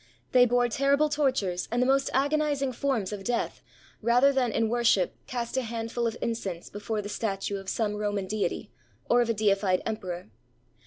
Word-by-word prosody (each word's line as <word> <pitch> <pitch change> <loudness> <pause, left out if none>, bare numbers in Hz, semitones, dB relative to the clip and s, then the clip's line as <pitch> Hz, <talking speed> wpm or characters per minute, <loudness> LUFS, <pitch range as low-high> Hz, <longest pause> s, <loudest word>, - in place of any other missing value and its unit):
They 250 -1 +6
bore 245 +1 +3
terrible 280 +5 +2
tortures 255 -12 0
and 240 - +1
the 250 - +3
most 270 +1 +2
agonizing 285 0 +1
forms 230 -6 -1
of 200 -2 -6
death 240 +3 -2 0.4
rather 245 +5 +4
than 255 -3 +1
in 225 +1 +1
worship 230 -5 +2
cast 240 0 -3
a - - +3
handful 230 0 -2
of 225 - -3
incense 195 -7 -4
before 210 +1 -3
the - - -5
statue 200 -1 -2
of 195 -1 -7
some 215 -2 0
Roman 205 -2 -2
deity 205 -2 -2 0.4
or 245 - +6
of 235 - 0
a - - +3
deified 200 -3 +2
emperor. 180 - -5
230 Hz, 175 wpm, -28 LUFS, 205-255 Hz, 0.4 s, They